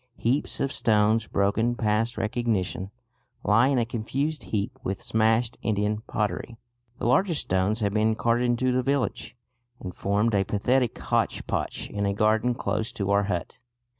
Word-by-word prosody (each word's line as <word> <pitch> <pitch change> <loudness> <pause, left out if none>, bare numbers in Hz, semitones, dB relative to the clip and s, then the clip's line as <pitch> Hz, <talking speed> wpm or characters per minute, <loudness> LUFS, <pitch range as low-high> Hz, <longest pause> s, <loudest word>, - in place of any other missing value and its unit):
Heaps 130 +6 0
of 135 - -1
stones, 110 0 +2
broken 105 +4 +1
past 115 +1 0
recognition, 105 -4 -1 0.5
lie 115 +5 +4
in 140 -1 +2
a 120 - +2
confused 135 +7 -3
heap 105 -2 -3
with 95 - -3
smashed 110 +1 +1
Indian 105 0 0
pottery. 105 +2 -2 0.4
The - - -4
largest 155 +7 +2
stones 95 +4 0
have 100 -1 0
been 110 +1 +2
carted 120 +2 +1
into 120 +1 +1
the 125 0 +2
village, 135 -2 -1 0.4
and 90 - -7
formed 105 +5 0
a 100 -1 +3
pathetic 120 +5 +1
hotchpotch - - -1
in 100 -1 -2
a 100 - -1
garden 110 +3 +2
close 110 -2 -2
to 100 -1 -2
our 100 0 +3
hut. 90 +2 -4
110 Hz, 155 wpm, -26 LUFS, 105-120 Hz, 0.5 s, lie